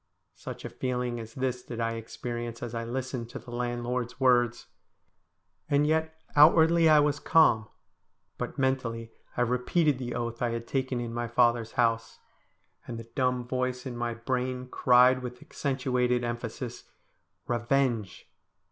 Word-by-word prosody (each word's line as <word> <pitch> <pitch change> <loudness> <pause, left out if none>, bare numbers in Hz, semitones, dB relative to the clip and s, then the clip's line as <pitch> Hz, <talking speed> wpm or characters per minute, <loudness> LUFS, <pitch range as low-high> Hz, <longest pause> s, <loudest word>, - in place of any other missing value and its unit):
Such - - -8
a - - -4
feeling 125 -2 -2
as 110 0 -9
this 130 -1 -2
did 120 -1 -7
I 115 0 0
experience 120 +1 -5
as 120 -1 -5
I 115 0 -2
listened 125 0 -4
to - - -7
the 120 - -11
landlord's 120 +1 -3
words. 120 -2 +3 1.0
And 145 +1 +3
yet 160 +1 +1 0.2
outwardly 160 +2 +6
I 155 -1 +7
was 145 0 +2
calm, 115 -9 +4 0.7
but - - -4
mentally 120 -4 -1 0.3
I - - +1
repeated 125 +4 +2
the 120 -1 -4
oath 115 -1 -3
Iliad 115 -1 -1
taken 130 -1 -1
in 120 -1 -4
my 120 0 -2
father's 120 -1 +2
house, 115 -2 +1 0.7
and 120 - -5
the 115 0 -10
dumb 125 -2 +1
voice 125 0 -2
in 125 -2 -5
my 120 -1 -2
brain 125 +1 -2
cried 125 +1 +5
with 125 0 -7
accentuated 125 -3 -1
em 120 0 -1
phasis, 120 +1 -7 0.3
' - - -46
Kevenge 120 -4 0
125 Hz, 150 wpm, -28 LUFS, 120-130 Hz, 1.0 s, I